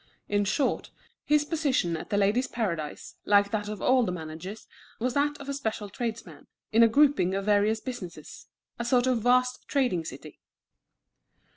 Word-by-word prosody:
In 205 0 +1
short, 235 +7 0 0.3
his 300 0 +2
position 285 - 0
at 160 - -7
The 205 - 0
Ladies' 210 +6 +2
Paradise, 170 -10 -4
like 205 0 +4
that 210 -1 -2
of 210 -2 -6
all 255 0 +4
the 225 - 0
managers, 170 +4 -7 0.3
was 250 +2 -1
that 290 +1 +1
of 280 - -9
a 280 - -2
special 220 -6 -3
tradesman, 230 +2 -6 0.2
in 225 - +5
a 230 - +8
grouping 265 -7 +3
of 195 0 -2
various 210 +1 +3
businesses, 180 - -8 0.3
a - - -1
sort 245 +1 +2
of 255 -2 +2
vast 250 +2 +2
trading 250 - +1
city. 150 0 -10
220 Hz, 165 wpm, -27 LUFS, 195-255 Hz, 0.3 s, a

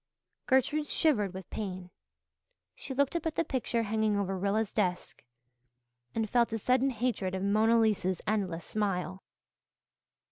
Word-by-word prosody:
Gertrude 290 +3 +2
shivered 230 - +2
with 190 +1 -8
pain. 185 -4 -5 0.8
She - - -7
looked 280 +4 +1
up 335 -1 -1
at 315 - -3
the - - +2
pictures 240 -5 -1
hanging 215 -1 +1
over 195 -1 -1
Rilla's 200 +3 0
desk 180 -4 -2 0.9
and 225 -1 0
felt 235 +1 +2
a 225 - -1
sudden 255 +4 +2
hatred 225 -6 -1
of 190 - -3
Mona 220 +3 +4
Lisa's 200 -5 +1
endless 190 -6 -1
smile. 190 -3 -2
215 Hz, 140 wpm, -30 LUFS, 190-250 Hz, 0.9 s, Mona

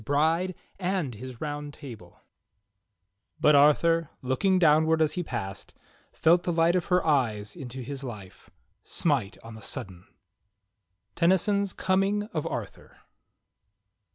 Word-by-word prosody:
^ri6e 160 +8 +1 0.2
and 180 -8 -1
Hiis 125 +3 -9
^our 145 +1 -5
6 - - -22
I5able 110 -10 -10 1.2
"But 150 0 +5
Arthur, 155 +3 +4
looking 185 +10 +2
downward 160 -1 +4
as 155 -1 +2
he 180 - -2
passed, 95 - -6 0.4
Felt 170 +2 +3
the 175 - -2
light 165 +1 +3
of 180 - 0
her 180 -1 +1
eyes 110 -9 0
into 130 -1 -7
his 140 +2 -6
life 105 -7 -9 0.3
Smite 135 - -1
on 115 0 -10
the 110 - -11
sudden." 95 -3 -6 1.1
Tennyson's 190 +3 +2
"Coming 195 +2 +1
of 155 -3 -2
Arthur." - - -7
150 Hz, 125 wpm, -27 LUFS, 125-175 Hz, 1.2 s, But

